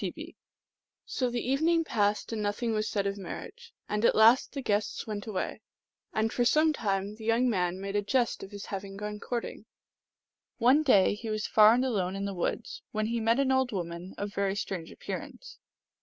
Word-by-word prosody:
T. -, -, 0 dB
B.) -, -, -10 dB, 0.7 s
So 255 Hz, -2 st, -1 dB
the 240 Hz, 0 st, -3 dB
evening 325 Hz, +5 st, +2 dB
passed, 210 Hz, -5 st, 0 dB
and 220 Hz, -, -2 dB
nothing 210 Hz, +3 st, -1 dB
was 215 Hz, 0 st, -1 dB
said 200 Hz, -2 st, -1 dB
of 200 Hz, 0 st, -2 dB
mar 195 Hz, -, -5 dB
riage; 475 Hz, +2 st, -13 dB, 0.2 s
and 210 Hz, +1 st, -1 dB
at -, -, +4 dB
last 225 Hz, +4 st, +6 dB
the 275 Hz, -, -3 dB
guests 205 Hz, -2 st, -1 dB
went 210 Hz, -1 st, -5 dB
away, 200 Hz, -4 st, -3 dB, 0.5 s
and 220 Hz, +1 st, 0 dB
for 245 Hz, -, +1 dB
some 310 Hz, +5 st, +4 dB
time 200 Hz, -5 st, -1 dB
the 220 Hz, -, -11 dB
young 230 Hz, +3 st, +2 dB
man 185 Hz, -5 st, 0 dB
made 195 Hz, +1 st, -4 dB
a 205 Hz, -, +3 dB
jest 240 Hz, +3 st, 0 dB
of 195 Hz, -, -8 dB
his 205 Hz, 0 st, -8 dB
having 195 Hz, 0 st, -6 dB
gone 210 Hz, 0 st, -5 dB
courting. 240 Hz, +1 st, -5 dB, 0.9 s
One 255 Hz, +5 st, +5 dB
day 205 Hz, -12 st, +5 dB
he 220 Hz, +2 st, -6 dB
was 215 Hz, 0 st, -2 dB
far 215 Hz, +1 st, +6 dB
and 255 Hz, +2 st, +1 dB
alone 195 Hz, -7 st, -1 dB
in 195 Hz, 0 st, -3 dB
the 200 Hz, -, -3 dB
woods, 475 Hz, -, -3 dB
when 215 Hz, 0 st, -1 dB
he 235 Hz, +1 st, -1 dB
met 230 Hz, +3 st, +2 dB
an 270 Hz, -1 st, +2 dB
old 260 Hz, -1 st, +2 dB
woman 175 Hz, -1 st, -5 dB
of 205 Hz, 0 st, -4 dB
very 200 Hz, -1 st, 0 dB
strange 185 Hz, -4 st, -4 dB
appear -, -, -5 dB
ance. -, -, -12 dB
215 Hz, 210 wpm, -29 LUFS, 200-245 Hz, 0.9 s, last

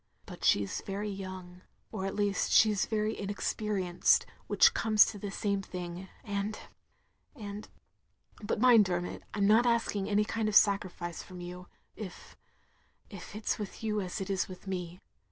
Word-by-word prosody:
" -, -, -39 dB
But -, -, -11 dB
she 100 Hz, -, +4 dB
's -, -, -5 dB
very 205 Hz, +1 st, -4 dB
young, 185 Hz, -2 st, -8 dB, 0.3 s
or 190 Hz, -, -3 dB
at 195 Hz, -, -4 dB
least 205 Hz, -2 st, 0 dB
she 215 Hz, -1 st, +6 dB
's 200 Hz, -, 0 dB
very 215 Hz, 0 st, 0 dB
inexperienced, 200 Hz, -2 st, +1 dB, 0.2 s
which 480 Hz, 0 st, +5 dB
comes 215 Hz, -2 st, +5 dB
to 205 Hz, -, -6 dB
the 205 Hz, -, -4 dB
same 200 Hz, 0 st, -1 dB
thing, 180 Hz, 0 st, -7 dB
and 205 Hz, +1 st, -3 dB, 0.4 s
— -, -, -42 dB
^and 205 Hz, -1 st, -7 dB, 0.4 s
— -, -, -39 dB
^but 210 Hz, -, -1 dB
mind, 230 Hz, -2 st, +6 dB
Dermot, 175 Hz, -1 st, -3 dB
I -, -, -4 dB
'm 200 Hz, -, +2 dB
not 225 Hz, +4 st, +5 dB
asking 230 Hz, -4 st, 0 dB
any 210 Hz, 0 st, +3 dB
kind 220 Hz, 0 st, -1 dB
of 210 Hz, -, -3 dB
sacrifice 185 Hz, -5 st, +2 dB
from 185 Hz, -1 st, -11 dB
you, 180 Hz, +1 st, -8 dB, 0.3 s
if 200 Hz, -5 st, -9 dB, 0.4 s
— -, -, -37 dB
^if 200 Hz, 0 st, -10 dB
it 215 Hz, 0 st, -8 dB
's -, -, +1 dB
with 210 Hz, +1 st, -7 dB
you 215 Hz, -1 st, 0 dB
as 185 Hz, +2 st, -4 dB
it 195 Hz, 0 st, -3 dB
is 190 Hz, -, 0 dB
with 185 Hz, +1 st, -11 dB
me. 180 Hz, -2 st, -5 dB
200 Hz, 190 wpm, -31 LUFS, 185-210 Hz, 0.4 s, she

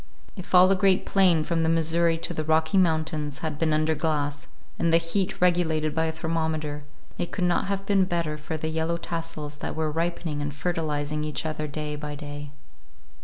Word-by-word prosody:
If 185 Hz, -2 st, -3 dB
all 180 Hz, +1 st, +9 dB
the 195 Hz, -, +4 dB
great 190 Hz, -1 st, +3 dB
plain 180 Hz, -5 st, +4 dB
from 165 Hz, +1 st, 0 dB
the 160 Hz, -, +2 dB
Missouri 165 Hz, +1 st, +2 dB
to 165 Hz, +1 st, -3 dB
the 155 Hz, -, -2 dB
Rocky 160 Hz, +3 st, +2 dB
Mountains 155 Hz, -5 st, +1 dB
had 155 Hz, -2 st, -3 dB
been 160 Hz, -1 st, +2 dB
under 155 Hz, +1 st, +2 dB
glass, 145 Hz, -2 st, -1 dB, 0.3 s
and 170 Hz, -1 st, +2 dB
the 165 Hz, -, +6 dB
heat 170 Hz, +3 st, -1 dB
regulated 165 Hz, -4 st, +2 dB
by 160 Hz, +1 st, +1 dB
a 160 Hz, -, 0 dB
thermometer, 160 Hz, -2 st, -2 dB, 0.3 s
it 175 Hz, -, -2 dB
could 185 Hz, -, -2 dB
not 175 Hz, +2 st, +2 dB
have 195 Hz, 0 st, -2 dB
been 195 Hz, -2 st, +3 dB
better 170 Hz, -4 st, -1 dB
for 150 Hz, +1 st, -5 dB
the 160 Hz, +1 st, -3 dB
yellow 160 Hz, +1 st, -1 dB
tassels 165 Hz, -3 st, -5 dB
that -, -, -4 dB
were 160 Hz, -1 st, -1 dB
ripening 165 Hz, -2 st, -2 dB
and 145 Hz, 0 st, -3 dB
fertilizing 150 Hz, -1 st, -2 dB
each 150 Hz, +1 st, -3 dB
other 155 Hz, -1 st, -2 dB
day 150 Hz, 0 st, -4 dB
by 150 Hz, 0 st, -5 dB
day. 145 Hz, 0 st, -7 dB
160 Hz, 195 wpm, -26 LUFS, 150-170 Hz, 0.3 s, all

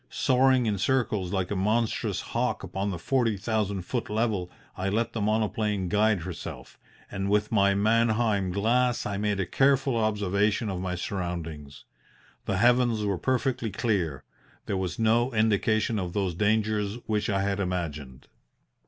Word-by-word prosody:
Soaring 130 Hz, -1 st, +3 dB
in 105 Hz, -3 st, 0 dB
circles 105 Hz, -5 st, 0 dB
like 95 Hz, -1 st, -1 dB
a -, -, 0 dB
monstrous 110 Hz, +4 st, 0 dB
hawk -, -, -1 dB
upon 95 Hz, +1 st, -3 dB
the 95 Hz, -, -3 dB
forty 115 Hz, +2 st, 0 dB
thousand 100 Hz, -2 st, -1 dB
foot 120 Hz, +6 st, -3 dB
level 105 Hz, -4 st, -1 dB, 0.3 s
I 95 Hz, +1 st, -2 dB
let 115 Hz, +4 st, -1 dB
the 115 Hz, -, -3 dB
monoplane 105 Hz, -2 st, 0 dB
guide 105 Hz, -1 st, +2 dB
herself, 85 Hz, 0 st, -8 dB, 0.3 s
and 95 Hz, -1 st, -2 dB
with 105 Hz, +1 st, +1 dB
my 100 Hz, -2 st, +3 dB
Mannheim 110 Hz, -2 st, +2 dB
glass 120 Hz, +5 st, +1 dB
I 100 Hz, -1 st, -2 dB
made 105 Hz, -1 st, -1 dB
a 95 Hz, -, 0 dB
careful 135 Hz, +1 st, +2 dB
observation 105 Hz, -1 st, +1 dB
of 90 Hz, -1 st, -4 dB
my 90 Hz, -1 st, -2 dB
surroundings. 85 Hz, -6 st, -5 dB, 0.6 s
The 100 Hz, -, -1 dB
heavens 120 Hz, 0 st, +3 dB
were 100 Hz, -3 st, -1 dB
perfectly 130 Hz, -3 st, 0 dB
clear; 90 Hz, -, -1 dB, 0.4 s
there 100 Hz, -, -2 dB
was 95 Hz, -2 st, -3 dB
no 115 Hz, +3 st, +2 dB
indication 110 Hz, 0 st, +2 dB
of 90 Hz, -2 st, -4 dB
those 95 Hz, -3 st, -1 dB
dangers 105 Hz, +1 st, 0 dB
which 105 Hz, -1 st, -1 dB
I 95 Hz, -1 st, +1 dB
had 100 Hz, 0 st, -1 dB
imagined. 80 Hz, -9 st, -4 dB
105 Hz, 155 wpm, -27 LUFS, 95-115 Hz, 0.6 s, Soaring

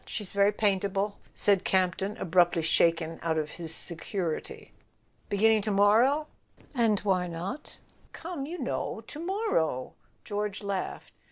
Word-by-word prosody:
She's 210 Hz, -4 st, -4 dB
very 200 Hz, 0 st, +4 dB
paintable," 200 Hz, 0 st, 0 dB, 0.2 s
said 200 Hz, -2 st, +3 dB
Camp 185 Hz, -2 st, +2 dB
ton, 200 Hz, +2 st, -3 dB
abruptly 175 Hz, -1 st, +3 dB
shaken 165 Hz, 0 st, +2 dB
out 160 Hz, -1 st, 0 dB
of 150 Hz, -1 st, -2 dB
his 165 Hz, -2 st, -2 dB
security. 170 Hz, 0 st, -3 dB, 0.3 s
" -, -, -39 dB
Beginning 215 Hz, +2 st, +4 dB
to 215 Hz, -, -2 dB
morrow? 225 Hz, +9 st, +4 dB, 0.4 s
" 225 Hz, -7 st, +1 dB
"Why 185 Hz, -3 st, +1 dB
not?" 180 Hz, -, -6 dB, 0.3 s
"Come, 325 Hz, -5 st, -6 dB
you 345 Hz, +3 st, -5 dB
know— -, -, -3 dB
to 295 Hz, -, -9 dB
morrow 335 Hz, -, -1 dB
/" -, -, -39 dB
George 205 Hz, -1 st, -3 dB
laughed. 200 Hz, -2 st, -4 dB
200 Hz, 145 wpm, -28 LUFS, 175-220 Hz, 0.4 s, very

